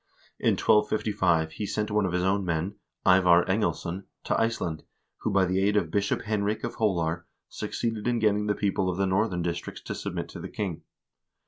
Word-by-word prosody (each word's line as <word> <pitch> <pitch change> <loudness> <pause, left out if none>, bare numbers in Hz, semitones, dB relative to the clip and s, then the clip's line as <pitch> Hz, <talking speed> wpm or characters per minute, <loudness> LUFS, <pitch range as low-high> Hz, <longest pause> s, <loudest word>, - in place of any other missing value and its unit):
In - - +3
1255 95 -7 +2
he 105 +5 -4
sent 105 +1 -2
one 105 -2 +2
of - - -3
his 90 0 0
own 95 +1 +2
men, 85 +2 -1 0.3
Ivar 90 -2 +6
Englesson, 95 -1 -1 0.2
to - - +1
Ice 115 +1 +1
land, 80 -3 -3 0.4
who, - - -2
by 100 -2 +3
the 95 +1 +1
aid 105 +1 +3
of 85 -6 0
Bishop 100 -1 0
Henrik 105 -1 -1
of - - -3
Holar, 90 -5 0 0.2
succeeded 115 -1 -3
in 120 -1 +2
getting 105 -1 +2
the 105 - +1
people 95 -2 0
of 90 - -2
the 95 - +2
northern 95 -2 +1
districts 85 -1 -4
to - - -4
submit - - -4
to - - -8
the - - -6
king. 95 -6 -4
95 Hz, 195 wpm, -27 LUFS, 90-105 Hz, 0.4 s, Ivar